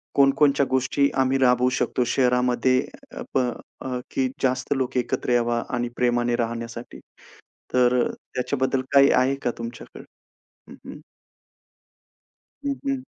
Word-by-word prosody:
कोणकोणच्या 140 0 +4
गोष्टी 130 +2 +1
आम्ही 130 0 +2
राबवू 125 -1 +3
शकतो 125 - 0
शहरामध्ये. 125 0 +2 0.3
अ - - -8
प - - +2 0.4
अ, 125 -1 -3
की 130 - 0 0.2
जास्त 130 +1 +1
लोकं 130 -1 -1
एकत्र 125 0 -2
यावा 120 -1 +1
आणि 120 0 -2
प्रेमाने 120 -1 +1
राहण्यासाठी. 115 0 -5 0.7
तर 125 0 +3
त्याच्याबद्दल 130 +1 -2
काही 140 0 +6
आहे 130 +2 +3
का 120 - +1
तुमच्याकडे? 115 0 -9 0.7
हं, - - -10
हं. - - -9 1.7
हं, 280 -1 0
हं. 270 -1 -2
125 Hz, 125 wpm, -24 LUFS, 120-135 Hz, 1.7 s, काही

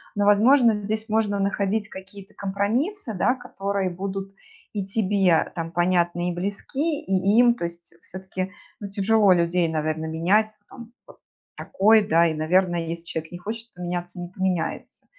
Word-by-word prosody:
но, 205 0 +1
возможно, 230 +4 +5
здесь 215 +2 -3
можно 215 -2 +1
находить 200 +1 -1
какие-то 190 +1 -12
компромиссы, 220 - -2
да, 245 +7 +2
которые 200 -5 -3
будут 195 +2 -5 0.4
и 200 -2 -3
тебе 195 -4 +2
там 165 -1 -4
понятны 175 0 +1
и 175 - -2
близки, 270 - -2
и 195 +3 +2
им. 240 -1 +6
То 175 - -4
есть 170 0 -7
всё-таки, 190 0 -6 0.3
ну, 205 - -6
тяжело 205 +1 +3
людей, 170 0 +1
наверное, 155 0 -2
менять, 210 +7 +1
там 235 -1 -12
п - - -15 0.4
такой, 215 -3 +3
да, 165 +1 +4
и, 160 - -2
наверно, 175 +3 +2
если 165 0 -4
человек 160 -1 -5
не 175 - -7
хочет 225 +4 -7
поменяться- 175 0 -5
не 175 - -5
поменяется. 185 -3 -3
195 Hz, 155 wpm, -24 LUFS, 175-215 Hz, 0.4 s, им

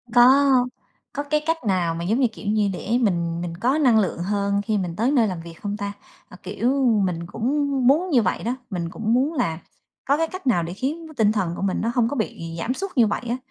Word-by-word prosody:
Có 265 +4 +7 0.7
có 285 - -3
cái 300 +1 0
cách 325 0 +1
nào 175 -4 +1
mà 170 - -4
giống 215 +8 +1
như 260 - +4
kiểu 205 - -9
như 210 -1 +2
để 225 +6 -1
mình 170 -5 0
mình 175 -1 -4
có 255 - +1
năng 250 -8 +4
lượng 185 -4 -1
hơn 200 0 0
khi 215 0 -1
mình 175 -4 -3
tới 235 +6 +1
nơi 240 -6 +3
làm 180 -4 -4
việc 165 0 -10
không 205 0 -3
ta? 200 -1 -4 0.4
À, 185 - -12
kiểu, 210 +7 -1 0.3
mình 170 -2 -3
cũng 280 +8 -1 0.2
muốn 330 +7 +3
như 255 -7 +4
vậy 185 - -1
đó, 240 +3 -1
mình 175 -4 -3
cũng 220 +5 -1
muốn 270 +6 +2
là 170 - -1 0.5
có 280 +2 +2
cái 325 +1 +1
cách 370 -5 -8
nào 175 -8 +3
để 170 +2 -5
khiến 295 - -3
nó 315 - -11
tinh 210 -2 +4
thần 190 -6 -1
của - - -6
mình 195 -1 0
nó 230 - 0
hông 240 -2 +3
có - - -3
bị 165 -8 -4
giảm 250 +7 -1
sút 390 +6 -5
như 235 -3 +5
vậy 205 - -2
á, 245 - 0
220 Hz, 255 wpm, -23 LUFS, 185-265 Hz, 0.7 s, Có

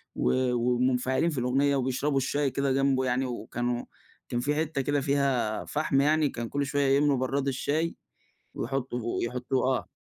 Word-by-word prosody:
و 130 -1 +1
ومنفعلين 125 +4 +1
في 155 - -4
الأغنية 135 +3 +2
وبيشربوا 135 +2 0
الشاي 135 +1 0
كده 140 +1 0
جنبه 135 -1 +2
يعني، 130 +1 +1
وكانوا 120 0 -3 0.4
كان 120 - -1
في 145 +4 0
حتَّة 155 -2 -1
كده 145 +1 0
فيها 135 -6 0
فحم 150 -2 +1
يعني 150 +1 +3
كان 120 -3 -5
كل 140 0 -1
شويَّة 140 -1 +2
يملوا 145 -1 +3
برَّاد 135 +2 -1
الشاي 150 +5 -1 0.6
ويحطوا 130 -2 -3 0.2
ويحطوه 125 +2 0
آه - - -8
135 Hz, 155 wpm, -28 LUFS, 125-140 Hz, 0.6 s, يعني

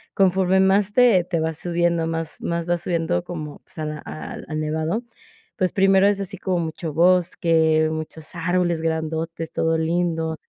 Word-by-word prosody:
conforme 190 0 +3
más 195 +1 +3
te 235 -7 +5
te 170 -1 -2
vas 160 -1 -2
subiendo 170 -1 0
más 165 -1 -4
más 170 0 -2
vas 175 -1 0
subiendo 165 - 0
como, 155 -4 -7
pues, - - -20
a 155 - -2
la 150 0 -4
al 155 - -8
al 155 0 -3
nevado. 160 +7 -1 0.5
Pues, 185 -1 0
primero 195 0 +4
es 200 -1 +1
así 195 0 -5
como 185 -1 -1
mucho 160 0 -5
bosque, 165 -2 +3
muchos 155 0 -6
árboles 175 0 0
grandotes, 160 0 -3
todo 165 0 +1
lindo. 165 0 0
170 Hz, 165 wpm, -22 LUFS, 160-185 Hz, 0.5 s, te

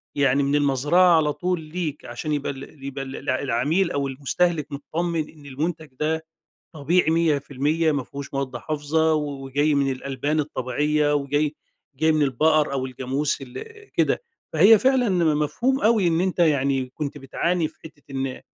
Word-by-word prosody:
يعني 140 -1 +3
من 140 +1 +1
المزرعة 145 +5 +4
على 150 -2 +2
طول 180 0 -1
ليك؛ 160 -5 -3
عشان 120 +6 -4
يبقى 145 -1 -1
ال 135 +1 -11
يبقى 135 0 -4
ال 135 +1 -6
العميل 140 +8 +1
أو 140 -1 -1
المستهلك 150 +4 0
متطمن 160 +3 -2
إن 150 -3 -17
المنتج 155 +4 -3
ده 160 +1 -1 0.5
طبيعي 160 +3 +2
100% 155 0 +1
مافيهوش 140 0 -5
مواد 135 -2 -2
حافظة، 155 +4 0
وجاي 145 0 0
من 140 -1 +2
الألبان 140 +3 -2
الطبيعية، 150 +1 0
وجاي 145 +1 0 0.4
جاي 160 +3 +3
من 155 -1 +2
البقر 150 +2 +2
أو 130 -1 -1
الجاموس 130 +3 -2
ال 125 -2 -7 0.3
كده، - - +1 0.3
فهي 200 +8 +7
فعلًا 260 0 +3 0.3
مفهوم 240 - 0
أوي 220 -6 +3
إن 165 0 +1
أنت 185 0 -1
يعني 140 -5 +2
كنت 145 -1 -4
بتعاني 165 +5 -1
في - - -23
حتة 155 -2 -13
إن 135 -1 -3
150 Hz, 150 wpm, -24 LUFS, 140-160 Hz, 0.5 s, فهي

